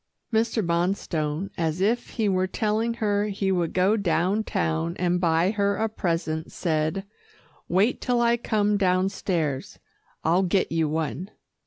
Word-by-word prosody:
Mr. 225 -2 +1
Bonstone, 170 -1 -1
as 165 0 0
if 230 +5 +1
he 220 -3 0
were 185 -1 +1
telling 220 +3 0
her 205 -2 +1
he 195 -1 -1
would 175 -3 0
go 185 +4 +3
down 200 +1 +1
town 80 - -1
and 180 0 +1
buy 165 +2 +3
her 200 -1 +1
a 220 - 0
present, 165 -6 -2
said, 160 +3 -1 0.6
"Wait 195 +7 +2
till 245 -1 +1
I 235 0 +4
come 210 -3 +1
downstairs. 185 -6 0 0.5
I'll 170 +4 +3
get 190 +1 +1
you 160 -2 +1
one." 160 - -3
185 Hz, 145 wpm, -25 LUFS, 165-210 Hz, 0.6 s, I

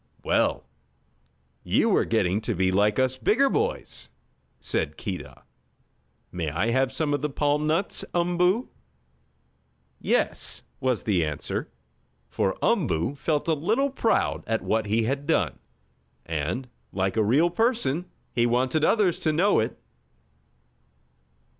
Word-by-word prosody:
"Well, - - +1 1.0
you - - +2
are - - +2
getting 95 +4 +1
to - - -2
be 95 +1 +2
like 105 +2 +2
us 130 0 +1
bigger 255 - +3
boys," 450 +3 -2 0.5
said - - -2
Keedah. 95 -4 -6 0.9
"May 85 -4 -3
I 100 +10 0
have 130 +1 +2
some 145 +2 -1
of 145 - 0
the 150 - -1
palm 145 +2 0
nuts, 165 +5 0
Umboo?" 180 +6 +2 1.3
"Yes," - - 0 0.2
was 130 -3 0
the 95 -6 +2
answer, 75 -3 -3 0.6
for 95 - 0
Umboo 140 - +1
felt 150 +2 -1
a 165 - +3
little 220 - +1
proud 230 -4 +1
at 115 0 -1
what 110 -1 0
he 110 +2 +2
had 140 +5 -2
done, - - +1 0.7
and, 85 - -3 0.2
like 95 -1 -1
a 110 - +3
real 145 +11 +3
person, 200 - 0 0.3
he 120 0 +2
wanted 130 +6 +1
others 195 -2 +3
to 155 - +1
know 185 +7 +3
it. 110 - -2
135 Hz, 130 wpm, -26 LUFS, 105-175 Hz, 1.3 s, bigger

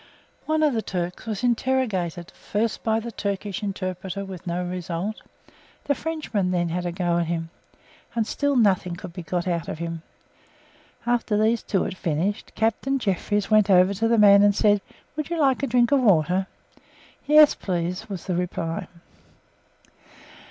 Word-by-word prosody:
One 310 0 +2
of 295 -3 +3
the 225 - 0
Turks 180 +1 -4
was 215 -1 -3
interrogated, 220 -9 0
first 215 +2 -3
by 220 0 +1
the 235 +1 -6
Turkish 200 -2 -3
interpreter 190 -1 -4
with 185 -2 -9
no 175 +1 -2
result; 180 +3 -4 0.6
the 285 - +1
Frenchman 290 - -2
then 175 -2 0
had 175 +1 -2
a - - -2
go 175 -1 0
at 170 - -1
him, 165 -1 -3 0.6
and 225 -2 +1
still 285 +5 0
nothing 190 -6 +2
could 175 0 -9
be 180 - -6
got 175 +2 -3
out 170 -2 -1
of - - -4
him. 165 0 -5 1.0
After 240 -3 +1
these 220 +2 +2
two 195 - 0
had - - -4
finished, 180 +4 -2
Captain 230 +5 0
Jefferies 205 -2 -1
went 215 -1 +5
over 185 +1 +5
to 220 +4 0
the 230 0 +3
man 200 -1 +7
and 205 -1 +4
said, 205 -2 +3 0.3
"Would 305 0 -4
you 340 -1 -2
like 270 -4 +3
a 275 - 0
drink 240 +1 +3
of 280 -2 +4
water?" 185 -3 +3 0.8
"Yes, 300 0 +7
please," 180 0 -3
was 190 -4 -6
the 185 - -1
reply. 170 -2 -3
200 Hz, 165 wpm, -24 LUFS, 180-230 Hz, 1.0 s, man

